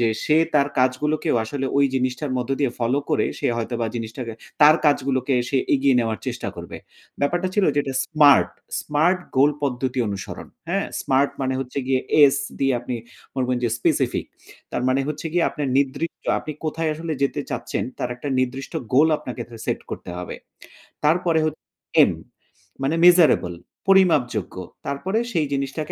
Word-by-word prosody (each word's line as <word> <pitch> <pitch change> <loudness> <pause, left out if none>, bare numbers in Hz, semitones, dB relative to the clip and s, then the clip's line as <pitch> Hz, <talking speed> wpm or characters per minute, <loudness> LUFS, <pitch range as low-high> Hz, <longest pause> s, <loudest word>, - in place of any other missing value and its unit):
যে 120 - +3 0.2
সে 155 - +3 0.2
তার 140 -1 +4
কাজগুলোকেও 130 +4 +1
আসলে 135 +3 -3
ওই 140 - +5
জিনিসটার 130 +2 -1
মধ্য 125 +1 -3
দিয়ে 135 - +2
follow 125 +4 +1
করে 150 - +2
সে 140 - -1
হয়তোবা 115 0 -2
জিনিসটাকে 115 +1 -5 0.3
তার 155 +2 +8
কাজগুলোকে 135 -2 +1
সে 140 - 0 0.2
এগিয়ে 135 -1 +3
নেওয়ার 115 -2 -1
চেষ্টা - - -3
করবে। - - -8 0.4
ব্যাপারটা 175 +6 +1
ছিল 205 - +3
যেটা 140 -2 0
smart, 150 -3 +5 0.3
smart 160 +5 +2 0.2
goal 140 +3 +6
পদ্ধতি 130 -1 -1
অনুসরণ। 100 -2 -6 0.2
হ্যাঁ - - 0
smart 135 +1 +2
মানে 130 -1 0
হচ্ছে 135 +1 -5
গিয়ে 130 -1 +2 0.2
এস 140 -2 +6 0.2
দিয়ে 135 -1 +2
আপনি 125 0 -4 0.4
বলবেন 125 -1 0
যে 120 - +2
specific - - +1 0.5
তার - - -1
মানে 130 +1 +2
হচ্ছে 150 +1 -4
গিয়ে 175 0 +2
আপনার 145 -3 -3
নির্দিষ্ট 140 +4 -2
আপনি 155 - -6
কোথায় 160 +1 -1
আসলে 160 +1 -4
যেতে 140 - 0
চাচ্ছেন - - -3
তার 125 - -2
একটা 135 +4 -6
নির্দিষ্ট 130 +1 -2 0.2
goal 145 +5 +5
আপনাকে 125 -4 -6
থে 115 - -11
set - - -1
করতে - - -6
হবে। 90 - -6 0.7
তারপরে 165 +1 +3
হচ্ছে 155 0 -4 0.4
এম - - +3 0.7
মানে 145 +4 +1
measurable 170 - +5 0.3
পরিমাপযোগ্য। 150 - +3 0.3
তারপরে 185 +10 -1
সেই 160 -6 +1
জিনিসটাকে 140 +3 -3
140 Hz, 160 wpm, -23 LUFS, 125-150 Hz, 0.7 s, তার